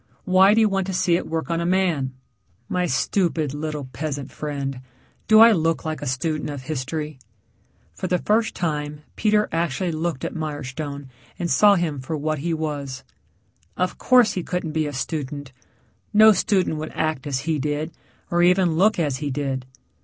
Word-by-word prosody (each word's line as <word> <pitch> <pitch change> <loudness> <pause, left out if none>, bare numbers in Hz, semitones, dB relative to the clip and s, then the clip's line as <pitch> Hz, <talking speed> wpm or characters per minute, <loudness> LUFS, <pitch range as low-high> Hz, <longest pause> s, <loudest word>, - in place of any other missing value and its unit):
Why 190 +2 +5
do 225 - +4
you 220 - +5
want 195 -2 -1
to 190 - -3
see 180 -2 +2
it - - -2
work 160 +1 -3
on 165 0 0
a - - -1
man?" 170 -8 +1 0.5
"My 180 -1 0
stupid, 160 0 0
little 150 -1 -4
peasant 145 -3 -4
friend, 140 -3 -4 0.5
do 215 0 +7
I 230 0 +9
look 165 -5 +1
like 155 0 -3
a 145 - -4
student 150 +4 -1
of 140 -3 -6
history?" 150 +1 -4 0.7
For 185 - -4
the 180 - +2
first 220 +4 +1
time 150 -3 -3
Peter 210 0 +2
actually 170 +2 -1
looked 160 -3 -2
at - - -4
Mirestone 145 -2 -5 0.3
and 170 -2 -2
saw 205 +8 +6
him 165 -6 -1
for 145 +5 -4
what 155 0 -2
he 170 +4 -2
was. 145 -4 -3 0.7
Of 180 0 -1
course, 250 -3 +5
he 185 - -2
couldn't 180 -2 -3
be 155 -1 0
a 145 - -5
student. 140 0 -4 0.6
No 220 +1 +9
student 190 -6 +1
would 155 +1 -5
act 155 -4 -1
as 135 -2 -1
he 155 +1 -1
did, 150 +3 -2 0.4
or 175 0 +3
even 180 -2 +4
look 210 +5 +4
as 145 -6 0
he 145 0 -3
did. 135 -2 -3
155 Hz, 180 wpm, -23 LUFS, 145-180 Hz, 0.7 s, I